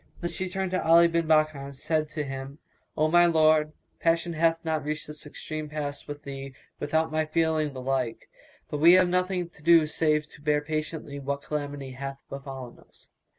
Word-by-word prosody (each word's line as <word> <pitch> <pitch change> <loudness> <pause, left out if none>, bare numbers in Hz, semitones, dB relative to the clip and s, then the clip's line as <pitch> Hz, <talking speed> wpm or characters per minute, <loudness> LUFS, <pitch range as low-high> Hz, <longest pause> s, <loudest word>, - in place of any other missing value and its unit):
Then 175 0 -3
she 185 +3 -3
turned 190 0 -2
to 185 - 0
Ali 170 +1 +7
bin 170 -1 0
Bakkar 155 -2 +3
and 140 0 -9
said 155 +2 -1
to 155 0 -3
him, 135 0 -6 0.4
"O 155 0 +3
my 175 +2 +5
lord, 155 -2 +4 0.3
passion 165 +1 +1
hath 165 +1 +3
not 160 -2 0
reached 155 +1 -3
this 150 0 -10
extreme 155 +1 -6
pass 145 -1 -5
with 145 0 -7
thee 135 -1 -7 0.2
without 160 +2 0
my 155 0 +1
feeling 155 -2 0
the 130 - -6
like; 130 -3 -2 0.4
but 150 - -2
we 170 +3 +8
have 185 0 +6
nothing 180 0 0
to 160 - -20
do 165 0 +6
save 150 0 +1
to 145 - -15
bear 150 0 +2
patiently 155 -1 -4
what 140 0 -3
calamity 145 -2 -4
hath 135 +1 -6
befallen 135 -3 -8
us." - - -21
155 Hz, 195 wpm, -27 LUFS, 140-165 Hz, 0.4 s, we